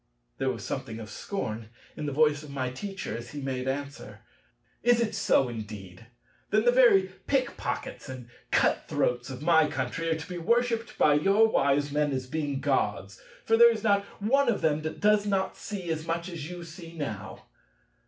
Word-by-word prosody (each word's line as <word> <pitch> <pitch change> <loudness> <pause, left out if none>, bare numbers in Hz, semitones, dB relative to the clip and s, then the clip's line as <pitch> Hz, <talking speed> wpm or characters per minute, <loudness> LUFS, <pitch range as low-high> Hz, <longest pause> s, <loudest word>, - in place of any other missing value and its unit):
There 135 - +1
was 115 -5 -4
something 130 -4 -4
of 110 -2 -8
scorn 110 - -4 0.3
in 150 - -4
the - - -1
voice 150 0 +3
of 150 - -11
my 130 -2 -3
Teacher 195 +9 -5
as 120 0 -7
he 145 - -7
made 130 -1 -3
answer: 140 +1 -5 0.6
"is 240 -1 +4
it 230 -2 0
so 135 - +3
indeed? 105 -3 -8 0.4
Then 215 +2 +2
the 245 - +6
very 215 -7 +5 0.2
pick 270 -2 +1
pockets - - -5
and 130 -2 -8 0.2
cut - - +2
throats 125 +1 0
of 130 +1 -7
my 160 -2 +5
country 165 0 -2
are 160 - +1
to 160 - -8
be 180 -1 -5
worshipped 235 +4 0
by 150 - +5
your 195 +9 +4
wise 140 -6 +2
men 145 -1 +1
as 130 -1 -2
being 145 0 -3
Gods: 105 -8 -1 0.2
for 225 - +4
there 235 0 +8
is 220 -2 -4
not 200 -2 +3 0.2
one 255 +6 +3
of 220 - 0
them 155 -1 +2
that 155 0 -5
does 210 0 +4
not 195 -1 0
see 185 -5 -5
as 160 0 -3
much 170 +2 -2
as 165 -3 -6
you 175 -1 -7
see 170 0 -11
now. 110 -10 -5
155 Hz, 195 wpm, -28 LUFS, 130-200 Hz, 0.6 s, there